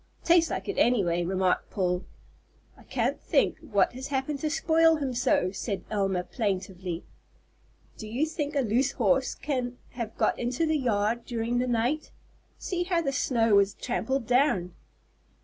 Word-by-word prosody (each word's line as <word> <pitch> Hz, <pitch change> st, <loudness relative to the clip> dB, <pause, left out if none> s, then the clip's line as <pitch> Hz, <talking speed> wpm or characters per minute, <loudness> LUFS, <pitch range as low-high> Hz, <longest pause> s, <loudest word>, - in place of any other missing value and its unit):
"Tastes 335 Hz, -1 st, +4 dB
like -, -, -4 dB
it, 405 Hz, -, -2 dB
any 240 Hz, -4 st, +4 dB
way," 175 Hz, 0 st, 0 dB
remarked 185 Hz, +1 st, 0 dB
Paul. 180 Hz, -2 st, -1 dB, 0.7 s
"I -, -, -18 dB
can't -, -, -2 dB
think -, -, +1 dB
what 245 Hz, -12 st, +1 dB
has 260 Hz, +2 st, -6 dB
happened 280 Hz, +1 st, -2 dB
to 310 Hz, -, -1 dB
spoil 325 Hz, +1 st, +4 dB
him 275 Hz, -4 st, -2 dB
so," 235 Hz, -6 st, +2 dB
said 200 Hz, 0 st, -4 dB
Elma, 195 Hz, -3 st, 0 dB
plaintively. 185 Hz, -5 st, -3 dB, 1.0 s
"Do 215 Hz, -, -6 dB
you 245 Hz, +8 st, 0 dB
think 305 Hz, -2 st, -4 dB
a 280 Hz, -, +3 dB
loose 255 Hz, +4 st, +1 dB
horse 270 Hz, -1 st, +1 dB
can 255 Hz, -4 st, -3 dB
have 235 Hz, -3 st, -6 dB
got -, -, +1 dB
into 250 Hz, +6 st, 0 dB
the 315 Hz, 0 st, +1 dB
yard 230 Hz, -1 st, 0 dB
during 235 Hz, 0 st, -1 dB
the 250 Hz, -, 0 dB
night? 245 Hz, +6 st, 0 dB, 0.5 s
See 355 Hz, -1 st, -2 dB
how 345 Hz, -2 st, +1 dB
the 275 Hz, -, 0 dB
snow 230 Hz, -6 st, +3 dB
is 200 Hz, 0 st, +1 dB
trampled 265 Hz, 0 st, -2 dB
down!" 245 Hz, -, +2 dB
245 Hz, 165 wpm, -27 LUFS, 200-280 Hz, 1.0 s, Tastes